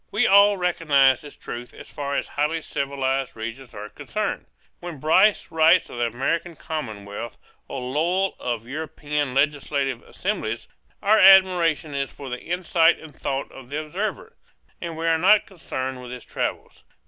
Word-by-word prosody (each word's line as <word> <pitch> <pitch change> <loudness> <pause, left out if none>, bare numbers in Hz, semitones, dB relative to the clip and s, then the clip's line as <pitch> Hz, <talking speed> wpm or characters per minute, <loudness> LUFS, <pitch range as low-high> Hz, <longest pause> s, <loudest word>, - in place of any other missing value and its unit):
We 220 +5 +1
all 200 0 +6
recognize 145 -7 +3
this 145 - -12
truth 120 +1 -8
as - - -11
far 140 -1 -4
as - - -2
highly 150 +3 -1
civilized 135 -1 -2
regions 115 +3 -7
are 105 +1 -6
concerned: 195 - -4 0.3
when 175 -4 -7
Bryce 165 +8 +3
writes 160 +2 +4
of 120 - -7
the 120 - +2
American 165 +8 -2
commonwealth, 110 -8 -6 0.3
or 135 - -5
Lowell 170 +9 0
of 120 -2 -3
European 145 -1 -3
legislative 140 -3 0
assemblies, 150 - -4 0.4
our 215 +2 +5
admiration 180 -5 +5
is 140 -1 -2
for 140 -2 -9
the 125 - -4
insight 170 -1 +2
and 155 -2 -13
thought 135 0 -3
of 130 -2 -12
the 145 +2 -2
observer, 215 - -4 0.5
and 170 -2 -5
we 165 - -3
are 165 -1 +3
not 205 +4 +5
concerned 130 -8 -5
with 125 - -9
his 125 -1 -8
travels. - - -4
150 Hz, 160 wpm, -24 LUFS, 130-175 Hz, 0.5 s, all